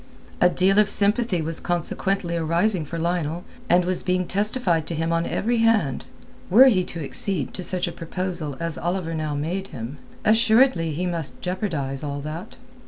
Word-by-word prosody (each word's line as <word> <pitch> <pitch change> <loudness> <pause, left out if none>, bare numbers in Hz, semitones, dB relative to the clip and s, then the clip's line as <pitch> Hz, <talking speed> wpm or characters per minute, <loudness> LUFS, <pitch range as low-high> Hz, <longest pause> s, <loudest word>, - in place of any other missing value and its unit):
A 180 - +6
deal 190 +3 +3
of 210 -1 +4
sympathy 205 -3 +1
was 165 +1 -3
consequently 175 +1 -2
arising 170 +2 0
for 165 - -6
Lionel 170 0 -2 0.3
and 175 0 +4
was 185 0 0
being 185 0 0
testified 195 -4 0
to 170 - -3
him 165 +1 -1
on 165 0 0
every 235 +2 -1
hand. 225 -12 +1 0.4
Were 235 +8 +8
he 200 -9 +4
to 165 - -6
accede 160 +1 +3
to - - -5
such 185 +1 -1
a - - -3
proposal 170 -4 -4
as 165 -1 +1
Oliver 175 -1 -2
now 155 -2 -3
made 175 +7 -3
him, 120 0 -8 0.3
assuredly 220 -5 +4
he 175 +5 -2
must 170 -5 -3
jeopardize 165 -8 -3
all 145 -1 -4
that. 155 +4 -7
175 Hz, 170 wpm, -23 LUFS, 160-195 Hz, 0.4 s, Were